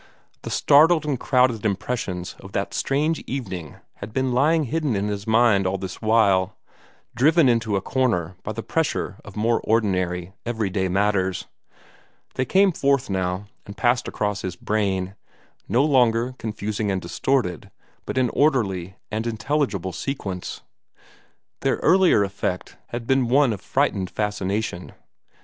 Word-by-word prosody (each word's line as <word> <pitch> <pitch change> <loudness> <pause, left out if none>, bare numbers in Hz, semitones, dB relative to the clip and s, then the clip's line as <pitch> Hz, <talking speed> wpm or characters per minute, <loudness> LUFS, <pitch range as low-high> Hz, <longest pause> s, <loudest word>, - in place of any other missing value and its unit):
The - - -6
startled 155 +2 +5
and 140 -5 -1
crowded 125 -5 +2
impressions 100 -3 -2
of 100 0 -12
that 100 - -2
strange 150 +3 0
evening 95 - -5 0.2
had 100 +2 -8
been 130 0 0
lying 155 +5 +3
hidden 150 -2 -1
in 100 +1 -1
his 100 +1 -4
mind 110 -4 +4
all 95 +1 -1
this 95 -1 -7
while, 100 -4 +3 0.6
driven 155 +5 +4
into 115 -4 +2
a 95 - 0
corner 95 -9 0
by 110 - -5
the 115 +1 -5
pressure 160 -10 -1
of 105 - -12
more 115 +2 +1
ordinary, 95 -5 0
everyday 105 -5 -1
matters. 95 -1 0 0.9
They 130 - -1
came 190 +7 +4
forth 140 - +1
now, 95 +1 -1 0.2
and 100 - -9
passed 120 +1 +2
across 105 -2 -2
his 90 -2 -4
brain 95 -2 -1 0.6
no 120 +7 +3
longer 125 -3 +3
confusing 105 -1 -3
and 95 -1 0
distorted, 90 - -1 0.4
but - - -3
in 125 -2 +2
orderly 100 - +1 0.2
and 110 +2 -2
intelligible 110 - -1
sequence. 95 -4 -5 1.0
Their - - +1
earlier 185 - +5
effect 95 -2 -3
had 120 0 -5
been 130 0 +2
one 135 -2 +4
of 100 - -7
frightened 95 -2 0
fascination. 105 -2 -3
110 Hz, 140 wpm, -23 LUFS, 95-130 Hz, 1.0 s, startled